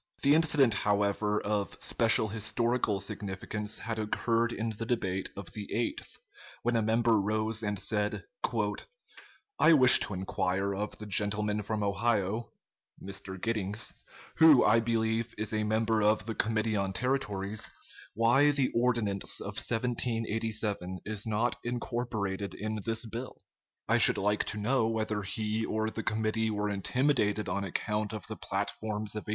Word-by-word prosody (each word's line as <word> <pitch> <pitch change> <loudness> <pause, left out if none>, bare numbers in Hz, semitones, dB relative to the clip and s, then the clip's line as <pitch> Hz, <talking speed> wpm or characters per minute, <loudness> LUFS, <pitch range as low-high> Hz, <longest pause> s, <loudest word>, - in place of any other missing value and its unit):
] - - -18
The 140 +1 +6
incident, 150 -6 +4
however, 105 0 +1
of 100 -1 -2
special 110 -2 +3
historical 115 0 0
significance 105 +2 -5
had 115 -1 -4
occurred 115 +2 0
in 115 +1 -2
the 115 - -2
debate 95 -6 -1
of 95 -5 -8
the 105 -1 -6
8th, 115 +1 -3 0.5
when 120 0 +1
a 115 - +3
member 110 0 +3
rose 110 +2 -1
and 105 -2 -2
said: 105 +2 -1 1.4
"I 165 - +7
wish 130 -4 +9
to 100 - -3
inquire 95 +1 -1
of 105 +2 -4
the 105 - -8
gentleman 105 +1 0
from 105 0 -2
Ohio 105 +2 0 0.5
[Mr. 95 -1 -6
Giddings], 110 0 -2 0.4
who, 155 -5 +7
I 110 +2 +5
believe, 115 0 -1
is 110 +1 -2
a 110 0 0
member 110 +1 +1
of 105 -1 +2
the 115 - -3
Committee 110 0 0
on 100 -1 -1
Territories, 105 -5 -2 0.5
why 120 +6 +4
the 140 -3 +1
Ordinance 115 -5 0
of - - -6
1787 115 -5 -1
is 110 0 -4
not 110 +3 0
incorporated 115 -5 -3
in 110 +1 -3
this 115 +1 0
bill? 115 +3 -7 0.5
I - - +3
should - - +7
like 105 +1 +1
to 105 - -3
know 110 +2 +1
whether 110 -2 -1
he 110 +2 -2
or 110 0 -1
the 115 - -4
committee 110 0 0
were 105 -1 -1
intimidated 105 0 +1
on 100 +2 -2
account 105 +3 -2
of 105 -4 -6
the - - -6
platforms 110 -1 -3
of 105 - -5
1852?" - - -7
110 Hz, 150 wpm, -30 LUFS, 105-115 Hz, 1.4 s, wish